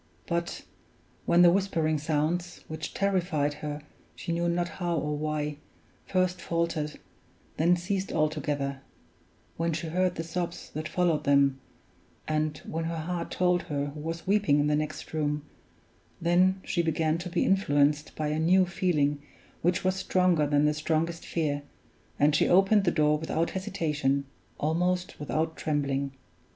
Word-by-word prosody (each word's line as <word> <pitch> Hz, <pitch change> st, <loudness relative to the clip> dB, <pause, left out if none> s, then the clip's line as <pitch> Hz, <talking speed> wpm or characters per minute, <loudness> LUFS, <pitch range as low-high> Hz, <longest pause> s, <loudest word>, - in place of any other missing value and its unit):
But, 170 Hz, 0 st, -2 dB, 0.6 s
when 175 Hz, +1 st, +6 dB
the 175 Hz, -, +8 dB
whispering 165 Hz, -5 st, +1 dB
sounds, 160 Hz, +4 st, -1 dB
which 155 Hz, 0 st, -6 dB
terrified 180 Hz, -7 st, +1 dB
her 150 Hz, 0 st, -4 dB, 0.3 s
she -, -, -5 dB
knew 170 Hz, +1 st, +1 dB
not 175 Hz, 0 st, 0 dB
how 175 Hz, -1 st, -2 dB
or 150 Hz, 0 st, -1 dB
why, 150 Hz, -1 st, -2 dB, 0.5 s
first 185 Hz, -1 st, +1 dB
faltered, 165 Hz, -3 st, -2 dB, 0.6 s
then 170 Hz, +3 st, +4 dB
ceased 185 Hz, +2 st, -2 dB
altogether; 145 Hz, -3 st, -1 dB, 0.8 s
when 165 Hz, 0 st, 0 dB
she 160 Hz, +1 st, -3 dB
heard 180 Hz, +2 st, +1 dB
the 165 Hz, -, -3 dB
sobs 170 Hz, +1 st, -4 dB
that 155 Hz, +1 st, -4 dB
followed 175 Hz, -4 st, +1 dB
them; 140 Hz, -1 st, +3 dB, 0.7 s
and 155 Hz, -1 st, 0 dB
when 165 Hz, +1 st, -3 dB
her 165 Hz, 0 st, -3 dB
heart 170 Hz, +1 st, -3 dB
told 180 Hz, -1 st, +2 dB
her 145 Hz, -1 st, -1 dB
who 150 Hz, -, -8 dB
was 165 Hz, +2 st, -5 dB
weeping 195 Hz, -7 st, +3 dB
in 145 Hz, -, +2 dB
the 150 Hz, 0 st, +2 dB
next 155 Hz, +1 st, -4 dB
room 150 Hz, -1 st, -1 dB, 0.8 s
then, 180 Hz, +3 st, +3 dB
she 175 Hz, -, +1 dB
began 160 Hz, 0 st, +1 dB
to 180 Hz, +1 st, -5 dB
be 175 Hz, 0 st, +1 dB
influenced 150 Hz, -6 st, +2 dB
by 155 Hz, -1 st, -1 dB
a 155 Hz, +1 st, -1 dB
new 185 Hz, +4 st, +4 dB
feeling 150 Hz, -5 st, 0 dB, 0.4 s
which 175 Hz, +2 st, +1 dB
was 185 Hz, 0 st, +2 dB
stronger 180 Hz, -5 st, +2 dB
than 145 Hz, 0 st, +3 dB
the 150 Hz, -, +3 dB
strongest 165 Hz, +2 st, -1 dB
fear, 145 Hz, -4 st, -1 dB, 0.6 s
and 145 Hz, +1 st, +4 dB
she -, -, +3 dB
opened 195 Hz, +3 st, +5 dB
the -, -, +5 dB
door 150 Hz, -2 st, +3 dB
without 160 Hz, +1 st, -1 dB
hesitation, 150 Hz, -7 st, -1 dB, 0.3 s
almost 180 Hz, +4 st, 0 dB
without 160 Hz, +2 st, -1 dB
trembling. 140 Hz, -2 st, -1 dB
160 Hz, 150 wpm, -28 LUFS, 150-175 Hz, 0.8 s, the